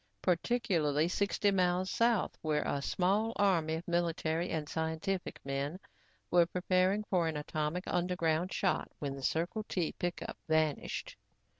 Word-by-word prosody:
Particularly 170 Hz, -6 st, +2 dB
sixty 200 Hz, +2 st, +1 dB
miles 185 Hz, -1 st, +1 dB
south 230 Hz, -3 st, +2 dB
where 155 Hz, -1 st, +1 dB
a 140 Hz, -, -1 dB
small 200 Hz, +9 st, +1 dB
army 170 Hz, -6 st, +2 dB
of 165 Hz, +2 st, -6 dB
military 170 Hz, -1 st, 0 dB
and 155 Hz, -2 st, -2 dB
scientific 160 Hz, +4 st, -2 dB
men 140 Hz, +5 st, -2 dB, 0.5 s
were 175 Hz, -1 st, +5 dB
preparing 185 Hz, +3 st, +1 dB
for 180 Hz, -5 st, +1 dB
an 160 Hz, -2 st, -2 dB
atomic 155 Hz, +3 st, -2 dB
underground 175 Hz, -1 st, 0 dB
shot 190 Hz, -, 0 dB
when 140 Hz, -2 st, -3 dB
the 135 Hz, -, -8 dB
Circle 170 Hz, -, -1 dB
T 175 Hz, -4 st, 0 dB
pickup 175 Hz, -1 st, -4 dB
vanished. 155 Hz, -2 st, 0 dB
175 Hz, 135 wpm, -33 LUFS, 160-185 Hz, 0.5 s, were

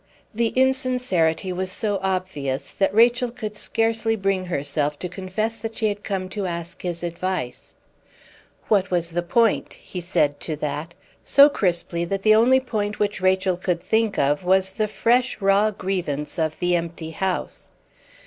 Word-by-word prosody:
The 230 Hz, +1 st, +1 dB
insincerity 250 Hz, -10 st, +1 dB
was 185 Hz, +1 st, -3 dB
so 205 Hz, 0 st, -1 dB
obvious 185 Hz, -8 st, -2 dB
that 195 Hz, -, +1 dB
Rachel 240 Hz, +3 st, +4 dB
could 215 Hz, -3 st, -6 dB
scarcely 225 Hz, +1 st, 0 dB
bring 195 Hz, -2 st, 0 dB
herself 145 Hz, -2 st, -1 dB
to 180 Hz, -, -4 dB
confess 195 Hz, +5 st, -3 dB
that 225 Hz, +1 st, -5 dB
she 220 Hz, -2 st, +1 dB
had 205 Hz, 0 st, -5 dB
come 190 Hz, -2 st, -3 dB
to 200 Hz, -1 st, -3 dB
ask 170 Hz, +1 st, -5 dB
his 175 Hz, -1 st, -4 dB
advice. 175 Hz, -6 st, -4 dB, 0.9 s
"What 195 Hz, -3 st, +2 dB
was 175 Hz, -2 st, 0 dB
the 175 Hz, +1 st, -1 dB
point?" 225 Hz, +5 st, +1 dB
he 180 Hz, -, -8 dB
said 150 Hz, -4 st, +1 dB
to 155 Hz, -, -4 dB
that, 150 Hz, +3 st, -4 dB, 0.3 s
so 280 Hz, +1 st, +7 dB
crisply 175 Hz, -7 st, 0 dB
that 195 Hz, +2 st, -3 dB
the 215 Hz, -, +6 dB
only 245 Hz, +4 st, +5 dB
point 215 Hz, -5 st, -3 dB
which 205 Hz, -2 st, -1 dB
Rachel 185 Hz, -1 st, +2 dB
could 180 Hz, -2 st, -1 dB
think 220 Hz, -1 st, +1 dB
of 145 Hz, +4 st, +1 dB
was 190 Hz, +1 st, +3 dB
the 215 Hz, +2 st, -1 dB
fresh, 240 Hz, +3 st, +1 dB
raw 200 Hz, +1 st, +3 dB
grievance 180 Hz, -7 st, -3 dB
of 155 Hz, -1 st, -1 dB
the 175 Hz, -1 st, +1 dB
empty 165 Hz, -1 st, -4 dB
house. 185 Hz, +2 st, -3 dB
190 Hz, 160 wpm, -23 LUFS, 170-215 Hz, 0.9 s, so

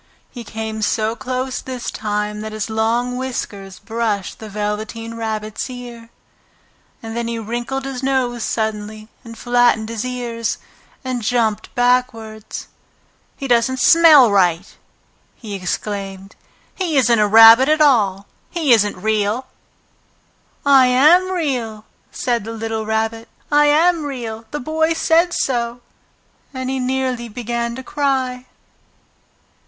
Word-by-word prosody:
He 240 Hz, -, -8 dB
came 220 Hz, 0 st, -5 dB
so 215 Hz, +1 st, 0 dB
close 255 Hz, +1 st, -3 dB
this 255 Hz, -2 st, -5 dB
time 210 Hz, 0 st, -3 dB
that 215 Hz, 0 st, -6 dB
his 215 Hz, 0 st, -4 dB
long 235 Hz, +3 st, 0 dB
whiskers 205 Hz, -7 st, -5 dB
brushed 215 Hz, -2 st, -3 dB
the 220 Hz, -, -9 dB
Velveteen 215 Hz, +2 st, -4 dB
Rabbit's 215 Hz, 0 st, -4 dB
ear, 240 Hz, -2 st, -9 dB, 0.9 s
and 225 Hz, 0 st, -6 dB
then 235 Hz, 0 st, -2 dB
he 235 Hz, 0 st, -3 dB
wrinkled 240 Hz, +4 st, -4 dB
his 265 Hz, -2 st, -5 dB
nose 260 Hz, -3 st, 0 dB
suddenly 215 Hz, -1 st, -3 dB
and 230 Hz, -2 st, -11 dB
flattened 240 Hz, -2 st, +2 dB
his 230 Hz, -2 st, -4 dB
ears 240 Hz, -2 st, -3 dB, 0.5 s
and 255 Hz, -2 st, -2 dB
jumped 220 Hz, -2 st, -1 dB
backwards. 235 Hz, -3 st, -1 dB, 0.7 s
"He 275 Hz, -, -5 dB
doesn't 245 Hz, +1 st, +2 dB
smell 305 Hz, -7 st, +7 dB
right!" 180 Hz, -2 st, +1 dB, 0.6 s
he 215 Hz, -4 st, -9 dB
exclaimed. 195 Hz, +1 st, -5 dB, 0.4 s
"He 340 Hz, -6 st, -1 dB
isn't 235 Hz, -3 st, +4 dB
a 210 Hz, -, +4 dB
rabbit 225 Hz, +5 st, +8 dB
at 310 Hz, 0 st, +3 dB
all! 210 Hz, -10 st, +3 dB, 0.2 s
He 315 Hz, -7 st, +2 dB
isn't 210 Hz, -4 st, +2 dB
real!" 215 Hz, +4 st, 0 dB, 1.2 s
"I 270 Hz, -2 st, +6 dB
am 310 Hz, +9 st, +5 dB
Real!" 250 Hz, -12 st, -3 dB, 0.3 s
said 240 Hz, -3 st, -1 dB
the 225 Hz, +2 st, -6 dB
little 225 Hz, -1 st, -4 dB
Rabbit. 220 Hz, +1 st, -2 dB, 0.2 s
"I 295 Hz, 0 st, +5 dB
am 325 Hz, +2 st, +3 dB
Real! 230 Hz, -5 st, -6 dB
The 295 Hz, -, -4 dB
Boy 315 Hz, +4 st, 0 dB
said 330 Hz, +2 st, +2 dB
so!" 240 Hz, -5 st, -1 dB, 0.7 s
And 260 Hz, 0 st, -3 dB
he 265 Hz, -, -2 dB
nearly 255 Hz, -2 st, -2 dB
began 235 Hz, +1 st, -3 dB
to 260 Hz, -, -8 dB
cry. 260 Hz, -3 st, -2 dB
235 Hz, 130 wpm, -19 LUFS, 220-260 Hz, 1.2 s, rabbit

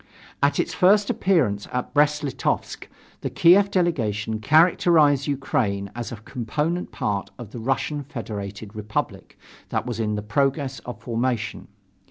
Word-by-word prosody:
At 140 Hz, 0 st, +2 dB
its -, -, 0 dB
first 200 Hz, +2 st, +4 dB
appearance 130 Hz, -, +1 dB
at 125 Hz, 0 st, -3 dB
Brest 150 Hz, +1 st, +3 dB
Litovsk, 140 Hz, -4 st, -2 dB, 0.3 s
the -, -, -3 dB
Kiev 190 Hz, +4 st, +5 dB
delegation 110 Hz, -, 0 dB
characterized 155 Hz, 0 st, +4 dB
Ukraine 105 Hz, -8 st, -1 dB
as 120 Hz, -1 st, -5 dB
a -, -, -4 dB
component 140 Hz, +10 st, -3 dB
part 100 Hz, -2 st, -2 dB
of 115 Hz, -4 st, -9 dB
the 120 Hz, -, -7 dB
Russian 135 Hz, +5 st, -1 dB
Federated 105 Hz, -5 st, -7 dB
Republic 105 Hz, 0 st, -4 dB, 0.3 s
that -, -, -1 dB
was 120 Hz, -2 st, -4 dB
in 105 Hz, -1 st, -1 dB
progress 135 Hz, +4 st, 0 dB
of 125 Hz, -, -8 dB
formation. 120 Hz, -1 st, -2 dB
130 Hz, 135 wpm, -24 LUFS, 110-150 Hz, 0.3 s, Kiev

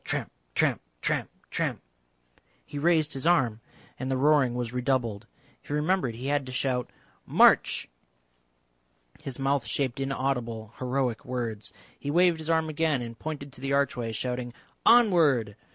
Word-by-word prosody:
Tramp, -, -, -3 dB, 0.2 s
tramp, -, -, +2 dB, 0.2 s
tramp, -, -, -1 dB, 0.2 s
tramp. -, -, -1 dB, 0.9 s
He 145 Hz, -, -6 dB
raised 160 Hz, -1 st, +2 dB
his 135 Hz, +3 st, -2 dB
arm, 125 Hz, -11 st, +3 dB, 0.4 s
and 130 Hz, +1 st, -3 dB
the 130 Hz, -, +1 dB
roaring 140 Hz, -3 st, +3 dB
was 120 Hz, -1 st, -3 dB
redoubled. 125 Hz, -5 st, -1 dB, 0.3 s
He -, -, -12 dB
remembered 150 Hz, -5 st, +1 dB
he 125 Hz, +3 st, -7 dB
had 145 Hz, -1 st, 0 dB
to -, -, -6 dB
shout 125 Hz, -1 st, -1 dB, 0.4 s
"March!" -, -, +5 dB, 1.3 s
His 135 Hz, -3 st, -5 dB
mouth 135 Hz, -1 st, +1 dB
shaped 135 Hz, -3 st, -1 dB
inaudible 125 Hz, -5 st, -2 dB
heroic 130 Hz, -2 st, -1 dB
words. 120 Hz, -4 st, -4 dB, 0.3 s
He 145 Hz, -, -5 dB
waved 170 Hz, +1 st, +4 dB
his 160 Hz, 0 st, -5 dB
arm 160 Hz, -1 st, +2 dB
again 155 Hz, -4 st, 0 dB
and 115 Hz, -1 st, -8 dB
pointed 145 Hz, -3 st, -6 dB
to -, -, -14 dB
the 135 Hz, 0 st, -1 dB
archway, 125 Hz, -5 st, 0 dB
shouting 125 Hz, +1 st, -3 dB, 0.3 s
"Onward!" 160 Hz, -, +5 dB
135 Hz, 145 wpm, -27 LUFS, 120-150 Hz, 1.3 s, March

